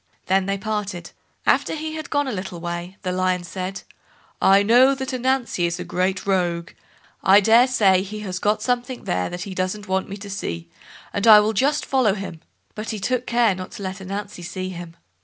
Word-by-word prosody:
Then 190 0 +2
they 195 0 0
parted. 200 -4 -4 0.3
After - - +2
he 315 0 -4
had 315 -1 -6
gone 285 -1 +1
a - - -2
little 185 -4 -5
way, 175 +2 -5
the 185 - -1
Lion 185 -1 0
said, 185 +2 -5 0.6
"I 195 +1 +6
know 250 +6 +5
that 265 -1 -4
Ananzi 255 -8 0
is 170 - -3
a - - -3
great 185 +1 -1
rogue; 175 -3 0 0.5
I 195 +2 +7
daresay 220 -3 +5
he 210 +2 -6
has 185 -3 -4
got 210 +1 +1
something 245 0 -2
there 90 0 -1
that 175 +1 -5
he 195 - -6
doesn't 185 +3 -3
want 190 +1 -1
me 200 - -6
to 200 0 -9
see, 85 - -5 0.4
and 200 +3 0
I 215 -1 +10
will 215 +1 +1
just 280 +7 +1
follow 250 -7 +2
him"; 190 -5 -7 0.3
but 215 +1 -6
he 220 - -2
took 250 +5 -1
care 235 -3 +3
not 185 0 -8
to 200 - -8
let 190 +1 -5
Ananzi 195 0 -6
see 185 +1 -5
him. 170 -2 -9
195 Hz, 200 wpm, -22 LUFS, 185-225 Hz, 0.6 s, I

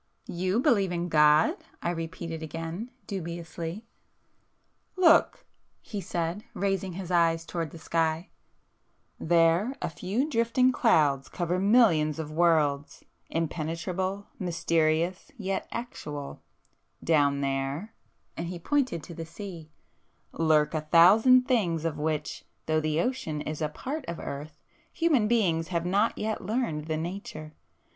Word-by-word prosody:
"You 185 +5 -1
believe 220 - +3
in 175 0 -2
God!" 150 0 +5 0.3
I 170 - 0
repeated 165 -1 -5
again 165 - -5 0.2
dubiously. 170 +1 -5 1.1
"Look!" 335 -3 +4 0.3
he 205 -2 -6
said, 175 0 -3
raising 195 -2 -1
his 185 0 -6
hand 165 -2 +2
towards 165 -4 -3
the - - -10
sky—"There 165 +4 -1
a - - -2
few 200 - -2
drifting 250 -1 +2
clouds 150 - +2
cover 175 +1 -1
millions 190 -8 +4
of 155 -2 -5
worlds, 155 -4 +1 0.2
impenetrable, 170 +4 -2
mysterious, 170 -1 0
yet 195 -3 -3
actual;—down 145 - -3
there—" 135 +9 -2 0.4
and 170 - -4
he 180 +1 -5
pointed 250 - 0
to 170 - -9
the 165 0 -6
sea, 170 -2 -9 0.6
"lurk 155 -2 +2
a 155 - 0
thousand 215 +11 +6
things 175 - +1
of 155 -2 -2
which, 155 0 -2 0.2
though 155 0 +2
the 155 0 0
ocean 170 - -2
is 155 +1 -5
a 155 - 0
part 270 - -5
of 170 - -4
earth, 145 +2 -7 0.3
human 300 -10 +2
beings 180 -8 +2
have 170 -2 -2
not 200 +5 +1
yet 220 0 -3
learned 190 -8 -2
the 160 -1 -1
nature. 165 -2 -6
170 Hz, 125 wpm, -28 LUFS, 155-200 Hz, 1.1 s, thousand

